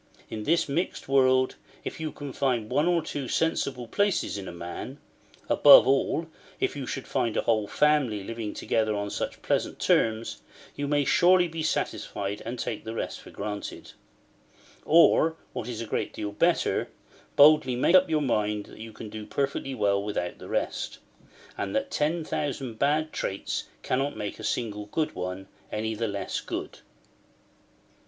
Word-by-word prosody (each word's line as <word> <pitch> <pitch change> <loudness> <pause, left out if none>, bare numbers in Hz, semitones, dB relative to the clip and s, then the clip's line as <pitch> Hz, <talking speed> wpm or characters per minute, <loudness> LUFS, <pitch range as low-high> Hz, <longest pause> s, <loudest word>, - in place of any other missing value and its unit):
In 110 -1 -5
this 165 +2 +2
mixed 160 +6 -2
world, 130 -1 +3 0.3
if - - -5
you 155 -1 -3
can 145 -2 -7
find 125 -6 0
one 150 +3 +2
or 175 -2 +2
two 140 -3 -4
sensible 135 -4 0
places 200 - +1
in 100 -2 -5
a - - -5
man—above 85 0 +3
all, 140 +4 +2 0.3
if - - 0
you 135 -3 -5
should - - -4
find 115 -2 0
a - - +1
whole 110 -2 +1
family 135 -7 +2
living 115 0 -5
together 110 -1 0
on 100 0 -3
such - - -4
pleasant - - 0
terms—you 115 +5 -1
may 145 0 +2
surely 180 +3 +5
be 165 -1 -5
satisfied, 105 -9 -2
and 120 +2 -4
take 115 -2 -4
the 110 +1 -6
rest - - -4
for - - -13
granted; 105 0 -6 0.9
or, 160 0 +5 0.2
what 110 - -4
is 120 -3 -4
a - - -3
great 110 - -2
deal 105 -1 -4
better, 170 - +1 0.5
boldly 145 -4 +6
make 130 +7 +2
up 185 -1 +6
your 155 -2 +2
mind 105 -4 0
that - - -14
you 110 0 -8
can 110 - -8
do 105 0 -8
perfectly 135 -1 -2
well 100 -3 +2
without 100 -4 -3
the - - -10
rest; - - -2 0.6
and 100 -1 -2
that - - -1
ten 160 +3 0
thousand 135 -7 -3
bad 155 +2 +1
traits 95 - -3 0.2
cannot 135 +3 -1
make 105 +1 -5
a - - -8
single 105 -1 -2
good 155 +8 -1
one 90 +1 -5 0.2
any 110 +1 -2
the 115 +1 -2
less 100 -1 -3
good. - - -5
120 Hz, 165 wpm, -27 LUFS, 105-150 Hz, 0.9 s, boldly